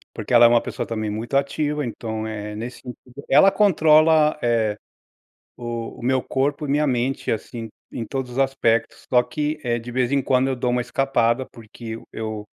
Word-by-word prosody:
Porque 110 +2 -4
ela 120 0 +8
é - - +9
uma 120 0 +4
pessoa - - -5
também 110 -2 -3
muito 115 +6 -4
ativa, 150 +1 -1
então, 110 -1 -5
eh, 105 -1 -6
nesse 120 +3 -6
sentido, 125 +2 -11
ela 150 +8 +6
controla, 155 -6 +4
eh, 115 -3 +1 0.8
o 120 -1 -6
o - - -13
meu 130 +1 +1
corpo 145 +2 -1
e 140 - -4
minha 150 +1 +2
mente, 130 +1 -1
assim, 115 +1 -4 0.2
em 115 - -5
todos 130 -1 -4
os 125 - -6
aspectos. 135 -4 0
Só 125 0 +6
que 150 +3 -3
é 120 -2 0
de 120 +1 -8
vez 125 +1 0
em 140 -1 +2
quando 130 0 +2
eu 130 - -1
dou 125 0 -1
uma 125 - +1
escapada, 130 -1 0
porque 115 0 -14
eu 115 - -11
eu 110 -1 -5
125 Hz, 195 wpm, -22 LUFS, 115-140 Hz, 0.8 s, é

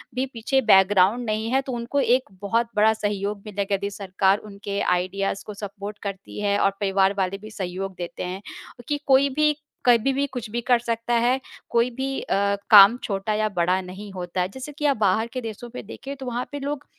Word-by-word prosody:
भी 255 +1 0
पीछे 255 +4 +1
बैकग्राउंड 195 +4 +5
नहीं 220 +1 -1
है, 265 +1 +3
तो 265 - -6
उनको 240 +4 -2
एक 255 -1 +2
बहुत 230 +3 +1
बड़ा 215 +1 +5
सहयोग 205 -1 -2
मिलेगा, 200 -1 -1
यदि 200 +1 -3
सरकार 195 0 +1
उनके 200 0 -4
आइडियाज़ 195 +2 0
को 210 - -7
सबवोट 205 +1 -7
करती 195 -1 -6
है 205 -1 +2
और 195 - +3
परिवार 195 -1 +2
वाले 195 0 0
भी 215 +2 -11
सहयोग 190 -1 -5
देते 175 0 -5
हैं 185 +2 -5 0.5
कि 290 -1 -1
कोई 275 +1 +5
भी 300 0 +4 0.3
कभी 245 +2 +4
भी 280 +1 +1
कुछ 240 -4 -5
भी 240 +2 -2
कर 245 -2 +5
सकता 230 0 -2
है, 240 +3 +3 0.3
कोई 235 +1 +2
भी 270 +1 -2
अ, - - -1 0.3
काम 205 +2 +9
छोटा 200 +1 -2
या 215 0 +1
बड़ा 180 +2 +2
नहीं 190 +2 -9
होता 180 0 -3
है। 180 - -1
जैसे 265 +7 -8
कि 300 - -2
आप 280 -4 +3
बाहर 210 +2 +2
के 255 - -3
देशों 230 +1 -7
पे 245 - -7
देखें, 270 +6 -8
तो 265 -1 -9
वहाँ 245 0 -3
पे 285 - -5
लोग 285 +1 -4
215 Hz, 210 wpm, -24 LUFS, 195-245 Hz, 0.5 s, काम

